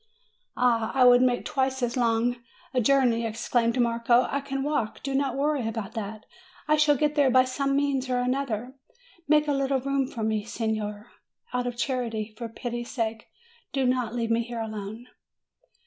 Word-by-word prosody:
"Ah, 230 Hz, -3 st, +2 dB
I 260 Hz, -, +5 dB
would 245 Hz, 0 st, +7 dB
make 250 Hz, -1 st, +2 dB
twice 265 Hz, -2 st, -1 dB
as 240 Hz, -1 st, 0 dB
long 240 Hz, 0 st, +1 dB, 0.4 s
a 255 Hz, -, +2 dB
journey!" 245 Hz, -2 st, +3 dB
ex 225 Hz, +1 st, -4 dB
claimed 235 Hz, 0 st, +2 dB
Marco; 235 Hz, +1 st, +3 dB
"I 280 Hz, -, -1 dB
can 270 Hz, -1 st, -3 dB
walk; 285 Hz, -7 st, -2 dB
do 275 Hz, -, -2 dB
not 270 Hz, -1 st, 0 dB
worry 285 Hz, -4 st, 0 dB
about 225 Hz, -2 st, -4 dB
that; 215 Hz, 0 st, -6 dB, 0.4 s
I 305 Hz, -, +4 dB
shall 300 Hz, -1 st, +4 dB
get 300 Hz, +2 st, +1 dB
there 290 Hz, -3 st, +4 dB
by 255 Hz, 0 st, +6 dB
some 275 Hz, +2 st, -1 dB
means 275 Hz, -2 st, 0 dB
or 250 Hz, -, +1 dB
other: 250 Hz, -1 st, -1 dB, 0.5 s
make 300 Hz, 0 st, +4 dB
278 -, -, -15 dB
MAY 290 Hz, -, +2 dB
a -, -, 0 dB
little 275 Hz, 0 st, +1 dB
room 275 Hz, 0 st, 0 dB
for 235 Hz, -5 st, -5 dB
me, 215 Hz, -1 st, 0 dB
signer, 220 Hz, -1 st, -3 dB, 0.4 s
out 250 Hz, 0 st, 0 dB
of 245 Hz, -1 st, -4 dB
charity; 230 Hz, -4 st, -2 dB
for 235 Hz, 0 st, -6 dB
pity's 240 Hz, +1 st, -5 dB
sake, 225 Hz, -3 st, -3 dB, 0.5 s
do 270 Hz, -1 st, +1 dB
not 250 Hz, -2 st, 0 dB
leave 230 Hz, -1 st, -1 dB
me 230 Hz, +1 st, +3 dB
here 235 Hz, 0 st, -5 dB
alone!" 220 Hz, +1 st, -6 dB
245 Hz, 190 wpm, -26 LUFS, 230-270 Hz, 0.5 s, would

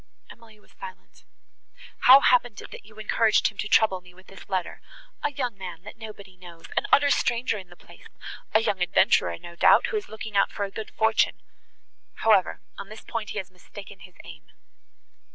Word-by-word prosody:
Emily 225 Hz, -2 st, -17 dB
was -, -, -25 dB
silent. 475 Hz, -1 st, -12 dB, 0.8 s
"How 265 Hz, +2 st, +10 dB
happened 245 Hz, -4 st, +2 dB
it -, -, -11 dB
that -, -, -11 dB
you 215 Hz, 0 st, -18 dB
encouraged 215 Hz, 0 st, +2 dB
him 210 Hz, -, -17 dB
to 210 Hz, -, -2 dB
trouble 200 Hz, -4 st, +3 dB
me 180 Hz, 0 st, -18 dB
with 185 Hz, +1 st, -18 dB
this 195 Hz, -, -15 dB
letter?—A 195 Hz, -, -5 dB
young 250 Hz, -6 st, -3 dB
man 180 Hz, -3 st, -8 dB
that 210 Hz, -, -10 dB
nobody 210 Hz, -4 st, -11 dB
knows;—an 170 Hz, -2 st, -6 dB
utter 285 Hz, 0 st, +5 dB
stranger 235 Hz, -4 st, 0 dB
in 185 Hz, -2 st, -13 dB
the 175 Hz, -, -15 dB
place,—a 215 Hz, -, -5 dB
young 200 Hz, -4 st, -1 dB
adventurer, 85 Hz, -, +2 dB
no 170 Hz, -, -12 dB
doubt, -, -, +5 dB
who 435 Hz, -, 0 dB
is 415 Hz, -, -6 dB
looking 220 Hz, -1 st, -8 dB
out 200 Hz, -, +3 dB
for 205 Hz, -, -4 dB
a 195 Hz, -, -9 dB
good 220 Hz, +1 st, -7 dB
fortune. 220 Hz, 0 st, +1 dB, 0.8 s
However, 210 Hz, -5 st, +2 dB, 0.2 s
on 200 Hz, 0 st, -8 dB
that 215 Hz, +1 st, -12 dB
point 225 Hz, -4 st, -5 dB
he -, -, -6 dB
has 190 Hz, -2 st, -5 dB
mistaken 195 Hz, +2 st, -13 dB
his 180 Hz, 0 st, -15 dB
aim." 160 Hz, -3 st, -13 dB
210 Hz, 185 wpm, -25 LUFS, 185-225 Hz, 0.8 s, How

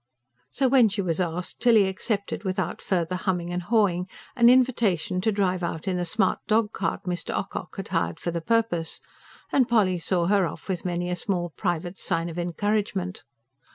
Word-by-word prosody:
So, 270 Hz, -, +1 dB
when 250 Hz, -4 st, +5 dB
she 200 Hz, 0 st, -2 dB
was 165 Hz, -2 st, -1 dB
asked, 175 Hz, 0 st, -3 dB
Tilly 225 Hz, -5 st, +5 dB
accepted 200 Hz, +2 st, -3 dB
without 190 Hz, -2 st, -2 dB
further 180 Hz, -1 st, -1 dB
humming 180 Hz, -2 st, -2 dB
and 180 Hz, -, -1 dB
hawing 185 Hz, -3 st, +1 dB, 0.3 s
an 235 Hz, -2 st, +6 dB
invitation 225 Hz, -8 st, +2 dB
to 220 Hz, -, +2 dB
drive 185 Hz, -3 st, 0 dB
out 170 Hz, 0 st, -4 dB
in 185 Hz, -, +1 dB
the 175 Hz, -, -1 dB
smart 190 Hz, +2 st, +1 dB
dog 220 Hz, 0 st, +2 dB
cart 165 Hz, -4 st, -2 dB
Mr. 180 Hz, -1 st, -3 dB
Ocock 190 Hz, -1 st, -5 dB
had 195 Hz, -, -5 dB
hired 165 Hz, -2 st, -1 dB
for 170 Hz, -, -2 dB
the 170 Hz, 0 st, -3 dB
purpose; 225 Hz, -6 st, 0 dB, 0.5 s
and 260 Hz, -3 st, +3 dB
Polly 195 Hz, -6 st, +3 dB
saw 175 Hz, 0 st, 0 dB
her 195 Hz, -1 st, +3 dB
off -, -, -9 dB
with 185 Hz, -3 st, -3 dB
many 175 Hz, 0 st, -1 dB
a -, -, 0 dB
small 175 Hz, -1 st, -2 dB
private 175 Hz, 0 st, -2 dB
sign 165 Hz, +1 st, 0 dB
of 170 Hz, +1 st, -5 dB
encouragement. 190 Hz, +1 st, -1 dB
185 Hz, 185 wpm, -25 LUFS, 175-210 Hz, 0.5 s, an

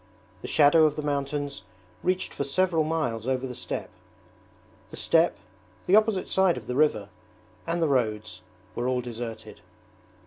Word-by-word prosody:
The -, -, -6 dB
shadow 155 Hz, +2 st, +5 dB
of 150 Hz, -1 st, +1 dB
the 150 Hz, -, -4 dB
mountains 145 Hz, 0 st, -2 dB, 0.4 s
reached 185 Hz, +1 st, -1 dB
for -, -, -2 dB
several 165 Hz, +3 st, +1 dB
miles 150 Hz, -8 st, -2 dB
over 130 Hz, 0 st, 0 dB
the 125 Hz, -, -5 dB
steppe. 125 Hz, -, -5 dB, 1.0 s
The -, -, -10 dB
steppe, 165 Hz, +1 st, +3 dB, 0.5 s
the 190 Hz, -, +4 dB
opposite 215 Hz, -3 st, +3 dB
side 190 Hz, -2 st, +2 dB
of -, -, -8 dB
the 125 Hz, -, -4 dB
river, 125 Hz, -8 st, +2 dB, 0.6 s
and 170 Hz, 0 st, 0 dB
the -, -, +3 dB
roads, 110 Hz, -8 st, -1 dB, 0.3 s
were 120 Hz, +1 st, -2 dB
all 130 Hz, -1 st, 0 dB
deserted. 120 Hz, -2 st, -7 dB
145 Hz, 150 wpm, -26 LUFS, 125-165 Hz, 1.0 s, shadow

